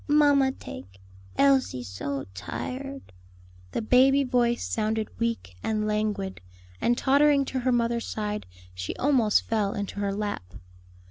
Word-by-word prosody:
Mamma 290 -2 +5
take; 95 - -10 0.4
Elsie 265 - +3
so 130 +7 -4
tired." 270 - -6 0.6
The - - -2
baby 265 +4 +5
voice 245 -2 +1
sounded 220 0 -1
weak 230 - -2
and 215 -1 -1
languid, 210 -2 -1 0.4
and 240 0 +2
tottering 280 +1 +4
to 260 - -2
her 255 +1 +1
mother's 235 -1 +1
side, 210 - -3 0.3
she 90 0 -5
almost 250 -7 +3
fell 210 -3 0
into 205 0 -4
her 200 -1 0
lap. 200 - -4
225 Hz, 130 wpm, -27 LUFS, 200-265 Hz, 0.6 s, Mamma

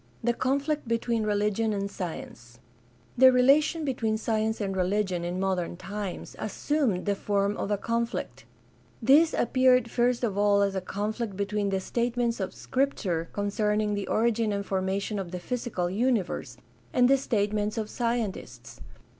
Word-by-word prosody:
The 240 +1 +2
conflict 280 +3 -1
between 230 -1 0
religion 210 +1 +1
and 200 0 -3
science. 120 -10 -7 0.3
— 120 - -32
The 260 0 +9
relation 295 +5 +4
between 225 -5 0
science 220 0 -1
and 195 -2 -2
religion 185 -1 0
in 175 +1 -3
modern 185 -3 -1
times 195 +1 -6
assumed 270 -12 -1
the 205 - +2
form 200 0 0
of - - -3
a 205 - +1
conflict. 230 +2 -3 0.5
This 290 +7 +5
appeared 255 -2 +3
first 245 0 +1
of 205 -4 0
all 205 -1 +4
as 200 -1 0
a 190 - -2
conflict 210 +2 -3
between 200 0 -1
the 195 -1 0
statements 235 +3 -1
of 190 -1 -2
Scripture 190 -11 -1
concerning 210 +1 0
the 200 -1 -3
origin 225 -1 +1
and 200 0 -2
formation 195 +2 -1
of 190 -3 -5
the 180 +1 -5
physical 230 -3 -2
universe 215 +1 -1 0.3
and 245 -1 +4
the 275 - +6
statements 210 -4 -1
of 220 -1 -2
scientists. 230 -4 -4
210 Hz, 155 wpm, -27 LUFS, 195-240 Hz, 0.5 s, The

